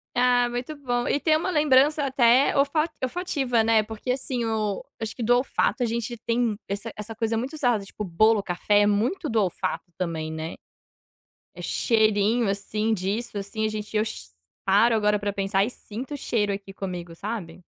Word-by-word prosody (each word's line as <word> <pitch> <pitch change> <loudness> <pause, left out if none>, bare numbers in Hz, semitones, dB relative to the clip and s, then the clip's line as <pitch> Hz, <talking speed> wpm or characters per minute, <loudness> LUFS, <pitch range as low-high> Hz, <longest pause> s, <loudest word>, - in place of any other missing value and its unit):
Ah 245 0 +4
muito 245 +5 -4
bom, 245 -3 -1
e 285 - +1
tem 310 +1 +3
uma 320 +4 0
lembrança 300 -2 +4
até 260 0 +4
olfa 285 +3 +2 0.2
olfativa 265 -6 0
né, 225 -1 +4
porque 220 +3 -4
assim 250 -2 -1
o 215 -3 -1 0.2
acho 220 0 -4
que 240 - -4
do 245 +2 +4
olfato 255 +1 0
a 240 - +2
gente 235 +1 -3
tem 230 -1 0
essa 200 +3 -4
essa 215 +1 -7
coisa 225 0 -1
muito 250 +7 -3
usada, 245 -9 +1
tipo, 210 +2 -7
bolo, 210 +4 +3
café 205 +3 +2
é - - +4
muito 240 - 0
do 225 -4 +2
olfato 185 -1 -2
também, 160 -3 -3
né, 160 +1 -5 1.0
é - - -10
cheirinho 220 0 +2
assim 210 +2 -1
disso 205 +4 -3
assim 205 +2 -2
a - - 0
gente 215 0 -6
eu 210 - +3
che 220 - -7 0.3
paro 210 +4 +4
agora 210 -1 +2
para 205 0 -2
pensar 195 0 0
e 210 - +1
sinto 250 +5 -7
o - - -2
cheiro 210 -7 0
aqui 195 0 -8
comigo 180 -3 -6
sabe? 185 -3 -6
220 Hz, 185 wpm, -25 LUFS, 205-245 Hz, 1.0 s, Ah